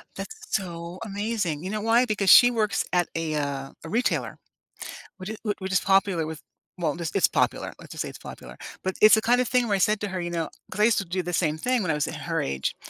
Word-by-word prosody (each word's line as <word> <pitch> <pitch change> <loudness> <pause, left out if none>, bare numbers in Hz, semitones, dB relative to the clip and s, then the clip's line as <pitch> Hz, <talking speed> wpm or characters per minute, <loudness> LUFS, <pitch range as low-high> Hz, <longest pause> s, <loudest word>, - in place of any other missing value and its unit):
That's 440 - -7 0.2
so 170 -2 -4
amazing. 205 -6 -2
You 185 - -4
know 215 0 -2
why? 230 +3 +4
Because 205 -4 0
she 245 +5 +9
works 215 -4 0
at 175 -1 +2
a, 165 -1 -2
uh 140 -2 -3
a 165 - -8
retailer, 240 +7 0 0.8
which 190 +2 -6
i - - -5 0.2
which 190 -1 -5
is 185 - +4
popular 195 -4 +2
with, 160 -1 -7 0.4
well, 160 -5 -1
this 165 -2 -4
it's 195 - +5
popular, - - 0
let's - - -13
just - - -3
say - - -6
it's - - -10
popular. - - -10 0.3
But 190 0 -2
it's 215 +1 +9
the 220 - +1
kind 245 +2 +3
of 250 - -1
thing 250 0 +2
where 205 - +2
I - - -1
said 210 +2 +2
to 205 - -1
her, 185 -1 -3
you 175 - -3
know 165 -2 -2 0.2
‘cause - - -7
I - - +6
used 230 -2 +3
to 195 - -4
do 180 +2 -2
the 175 +1 -4
same 155 -3 +1
thing 250 +7 0
when 180 - 0
I - - 0
was 150 - -1
at - - -5
her - - 0
age, 70 0 -2
190 Hz, 260 wpm, -25 LUFS, 165-215 Hz, 0.8 s, she